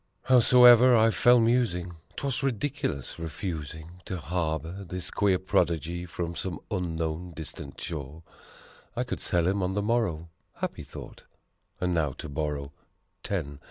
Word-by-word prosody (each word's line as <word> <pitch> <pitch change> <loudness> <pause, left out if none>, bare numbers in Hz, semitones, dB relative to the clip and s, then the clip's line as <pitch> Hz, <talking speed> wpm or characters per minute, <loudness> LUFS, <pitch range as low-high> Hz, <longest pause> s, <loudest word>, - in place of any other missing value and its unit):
Howsoever, 125 -1 +7
I 115 0 +5
fell 120 +2 +5
musing, 110 -8 +1 0.2
'twas 135 -2 -1
ridiculous 135 - -2
refusing 80 +1 -6
To 95 - -4
harbor 85 +2 -3
this 90 0 -3
queer 100 -3 +2
prodigy 85 -1 0
from 85 0 -4
some 90 -3 -4
unknown, 85 -2 -2
distant 75 -3 -8
shore; 75 0 -6 0.7
I - - 0
could - - -4
sell 85 -1 +1
him 100 +1 +1
on 90 +1 0
the 105 - 0
morrow! 100 -8 0 0.3
Happy - - -4
thought! - - -10 0.5
And 90 -1 0
now 75 -5 +1
to 80 - -8
borrow 75 -1 -3 0.5
Ten. 75 -8 -3
90 Hz, 135 wpm, -28 LUFS, 80-105 Hz, 0.7 s, Howsoever